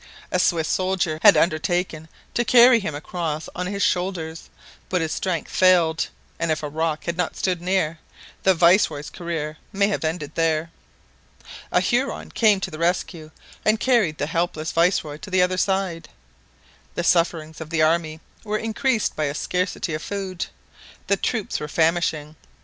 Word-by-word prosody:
A 180 - +1
Swiss 165 -3 +2
soldier 185 -4 0
had 205 - +8
undertaken 165 0 0 0.3
to 240 - +1
carry 240 0 +7
him 175 -8 -4
across 155 0 -4
on 180 0 -3
his 200 +1 -2
shoulders, 175 -3 -2 0.4
but 185 - +1
his 160 -2 -2
strength 180 -5 -2
failed, 175 -4 +3 0.3
and 165 0 -1
if 155 0 -1
a 150 - -3
rock 155 0 -2
had 170 0 -3
not 180 -2 -1
stood 180 -3 -1
near, 175 -3 0 0.4
the 190 -1 +4
viceroy's 170 -4 +3
career 160 -3 -4
might 200 +1 +1
have 195 - -2
ended 155 -2 -3
there. 165 0 0 1.0
A - - +3
Huron 250 +3 -1
came 215 -4 +3
to - - -3
the 155 - -8
rescue 170 -2 -1 0.3
and 215 0 +3
carried 225 -13 +2
the - - -1
helpless 165 0 -2
viceroy 165 -3 +1
to 200 +6 -10
the 185 -1 +3
other 185 0 0
side. 190 -4 -1 0.9
The - - -1
sufferings 165 -2 +1
of 160 - -7
the 160 -1 +1
army 160 0 +1 0.2
were 215 -1 -1
increased 225 +1 0
by 155 - 0
a 140 0 -2
scarcity 180 0 -2
of 155 - -3
food. 190 -2 -4 0.6
The 200 - +2
troops 215 +1 -2
were 150 - -5
famishing. 160 -1 0
170 Hz, 165 wpm, -23 LUFS, 155-190 Hz, 1.0 s, had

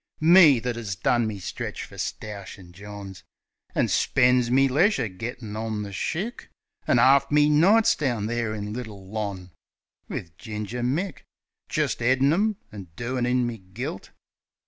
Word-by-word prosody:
Me, 160 -5 +7
that 120 0 -3
'as 105 -5 -4
done 115 +4 +1
me 105 -2 -4
stretch 95 - -5
fer - - -12
stoushin' 100 -3 -7
Johns, 100 0 -10 0.5
An' - - +2
spen's 125 -1 +3
me 135 +2 +4
leisure 145 - +2
gittin' 110 +3 -7
on 110 -1 -3
the 100 -1 -8
shick, 195 - -4 0.4
An' - - +4
'arf 140 +1 +5
me 150 0 +4
nights 195 +9 +5
down 120 -8 -1
there, 115 0 -1
in 105 0 -5
Little 110 -5 -8
Lons., 100 -3 -5 0.6
Wiv 85 -2 -6
Ginger 110 +1 -5
Mick, 160 +10 -1 0.5
Jist - - -1
'eadin' 130 +4 +3
'em, 210 +4 +1 0.2
an' 100 -4 -9
doin' 120 +3 -2
in 125 0 +2
me 120 -2 -4
gilt. 95 +3 -7
120 Hz, 150 wpm, -25 LUFS, 105-135 Hz, 0.6 s, Me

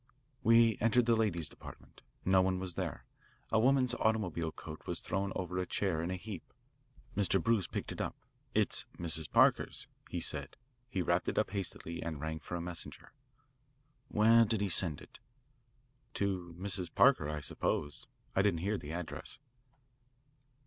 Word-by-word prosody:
"We 115 -1 +5
entered 115 +2 +4
the 115 -1 +4
ladies' 85 -8 +1
department. - - -12 0.2
No 95 0 +5
one 95 0 +1
was 90 -1 -3
there. - - -4 0.5
A 110 - +4
woman's 130 +1 +4
automobile 95 -9 0
coat 80 0 -10
was - - -1
thrown 100 0 -2
over 90 0 -2
a 90 - -1
chair 90 -6 0
in 85 - -2
a 95 - -1
heap. 95 -1 -8 0.6
Mr. 95 -1 +3
Bruce 105 0 +2
picked - - -4
it - - -4
up. - - -2 0.4
'It's - - +1
Mrs. 80 -3 0
Parker's,' - - +3 0.2
he - - -2
said. 70 -2 -2 0.3
He 95 -5 -1
wrapped - - +1
it - - -4
up - - +2
hastily, 90 -4 -3
and 80 -3 -4
rang 80 +1 -3
for 85 - -6
a 85 - -2
messenger." 85 -1 -6 0.9
"Where 115 +1 +6
did 110 -1 +1
he 100 - +1
send 85 -4 -1
it?" - - -14 1.0
"To 90 -4 -1
Mrs. 95 -2 -3
Parker, 125 - +5
I 75 0 -2
suppose. 70 0 -2 0.3
I 95 - +5
didn't 95 -5 +2
hear 100 +3 0
the 75 - -7
address." 90 -1 -5
95 Hz, 165 wpm, -33 LUFS, 85-105 Hz, 1.0 s, Where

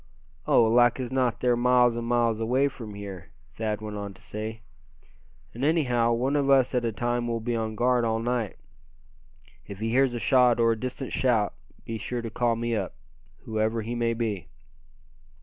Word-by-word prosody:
"Oh! - - +5
like 120 +2 +4
as 125 -1 -4
not 130 -3 0
they're 125 -1 +3
miles 125 0 +4
and 120 0 -4
miles 120 -2 +1
away 130 +5 +2
from 110 -6 -9
here," 95 -4 -8 0.2
Thad 110 -1 -3
went 105 -1 -6
on 100 -1 -6
to - - -18
say. 110 +1 -6 0.9
"And 120 - -6
anyhow, 125 -7 +2
one 130 +5 0
of 140 -1 +1
us 135 -2 +4
at 125 -1 +1
a 115 - 0
time 120 +2 -1
will 115 -1 -1
be 120 +1 -2
on 110 -1 -2
guard 125 +1 +2
all 110 -1 +1
night. 115 -2 -2 1.1
If 100 -1 -8
he 110 +1 -2
hears 130 0 +3
a - - -2
shot 125 -2 +4
or 115 0 +4
a - - +1
distant 130 +3 -5
shout 115 -6 +1 0.3
be 115 -1 -4
sure 120 +3 -4
to 115 - -5
call 120 +1 +1
me 115 0 -1
up, 95 -7 -3 0.5
whoever 110 +1 -1
he 115 +2 -4
may 115 -1 0
be." 105 -8 -3
115 Hz, 190 wpm, -26 LUFS, 110-125 Hz, 1.1 s, Oh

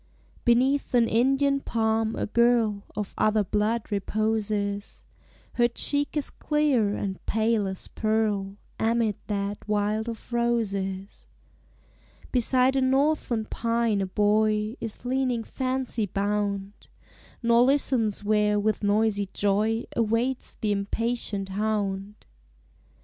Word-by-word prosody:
Beneath 255 +3 +2
an 235 -1 +4
Indian 270 +5 +2
palm 225 -3 0
a - - -2
girl 230 -2 +2
Of 210 -2 -4
other 215 -1 +3
blood 210 +4 -1
reposes; 205 0 -2 0.5
Her 240 -1 +3
cheek 285 +5 -1
is 295 - +1
clear 275 -9 +1
and 190 -2 -4
pale 220 -2 +1
as 190 -1 -5
pearl 210 -3 -1 0.2
Amid 225 -2 +1
that 200 -1 -2
wild 210 +2 0
of 230 +1 -9
roses. 200 -5 -2 1.0
Beside 255 +1 +3
a - - +2
northern 265 -3 +1
pine 230 -2 0
a 190 - -1
boy 210 +2 +1
Is 225 +1 -6
leaning 250 -2 0
fancy 255 -4 -1
bound. 200 0 -2 0.6
Nor 235 0 +5
listens 250 -6 +2
where 210 0 +2
with 215 +1 0
noisy 205 -1 +1
joy 215 +3 +1
Awaits 235 +3 0
the 215 - +1
impatient 205 0 -2
hound. 205 -1 -2
220 Hz, 110 wpm, -26 LUFS, 205-235 Hz, 1.0 s, Nor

